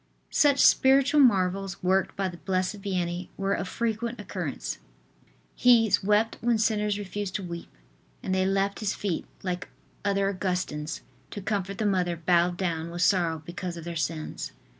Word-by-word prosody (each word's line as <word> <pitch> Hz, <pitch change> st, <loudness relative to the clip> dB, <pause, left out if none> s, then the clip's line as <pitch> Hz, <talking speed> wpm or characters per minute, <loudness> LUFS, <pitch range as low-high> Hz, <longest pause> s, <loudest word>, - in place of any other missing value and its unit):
Such 290 Hz, -2 st, +4 dB
spiritual 275 Hz, +2 st, +5 dB
marvels, 195 Hz, -7 st, +2 dB
worked 190 Hz, +1 st, +2 dB
by 195 Hz, -1 st, 0 dB
the 175 Hz, -2 st, -7 dB
Blessed 185 Hz, +3 st, -2 dB
Vianney, 180 Hz, -2 st, -2 dB
were 195 Hz, 0 st, 0 dB
of 190 Hz, -, -2 dB
frequent 235 Hz, +2 st, -2 dB
occurrence. 180 Hz, -7 st, -4 dB, 0.7 s
He 230 Hz, -4 st, +5 dB
wept 210 Hz, +3 st, +2 dB
when 235 Hz, -1 st, +2 dB
sinners 210 Hz, -2 st, +1 dB
refused 205 Hz, -1 st, -4 dB
to 200 Hz, -, -2 dB
weep, 170 Hz, -1 st, -7 dB, 0.5 s
and 185 Hz, -, -1 dB
they 190 Hz, 0 st, +2 dB
left 195 Hz, +1 st, 0 dB
his 210 Hz, -2 st, -1 dB
feet 190 Hz, -5 st, -3 dB, 0.2 s
like 180 Hz, 0 st, -3 dB, 0.3 s
other 200 Hz, -1 st, +1 dB
Augustines, 180 Hz, -5 st, -2 dB, 0.3 s
to -, -, -6 dB
comfort 195 Hz, -1 st, -2 dB
the 215 Hz, -, -1 dB
mother 180 Hz, -4 st, +1 dB
bowed 175 Hz, +1 st, +2 dB
down 170 Hz, -3 st, -2 dB
with 175 Hz, +1 st, -2 dB
sorrow 170 Hz, -5 st, +2 dB
because 175 Hz, 0 st, -5 dB
of 165 Hz, -, -7 dB
their 170 Hz, 0 st, -5 dB
sins. 160 Hz, -1 st, -3 dB
190 Hz, 160 wpm, -27 LUFS, 175-210 Hz, 0.7 s, spiritual